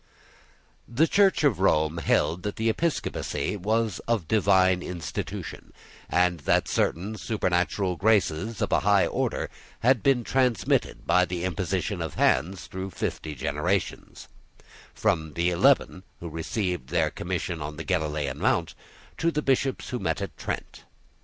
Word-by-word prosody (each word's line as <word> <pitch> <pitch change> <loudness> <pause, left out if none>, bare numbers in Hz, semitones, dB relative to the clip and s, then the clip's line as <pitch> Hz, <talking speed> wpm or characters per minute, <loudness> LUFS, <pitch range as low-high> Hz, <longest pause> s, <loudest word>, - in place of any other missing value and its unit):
The 125 +7 +3
Church 195 -3 +3
of 130 -11 +3
Rome 80 -3 +2
held 80 +1 +1
that 105 +2 -5
episcopacy 115 - -1
was 110 +1 0
of 115 -9 0
divine 95 -3 +3
institution, 85 -4 -6 0.4
and 90 -1 +2
that 70 - +1
certain 100 +6 -1
supernatural 90 -3 0
graces 105 0 +1
of - - -2
a - - +4
high 100 -1 +4
order - - -1 0.3
had 125 -1 +4
been 130 0 +3
transmitted 125 -5 +1
by 90 0 +4
the 90 0 -4
imposition 90 +1 -2
of 80 -4 -4
hands 90 +8 +1
through 95 +1 -6
fifty 80 -4 -4
generations, 75 +8 -2 0.7
from 80 -1 0
the 85 +1 +1
Eleven 90 +1 +3 0.2
who 85 - -6
received 80 - -3
their - - +1
commission 90 -2 -3
on 75 +1 -5
the 80 - -5
Galilean 75 -6 -1
mount, - - +1 0.5
to 165 - +2
the 150 -2 -2
bishops 135 0 0
who 125 - -3
met 80 -4 -1
at - - -5
Trent. - - -5
95 Hz, 140 wpm, -26 LUFS, 85-110 Hz, 0.7 s, a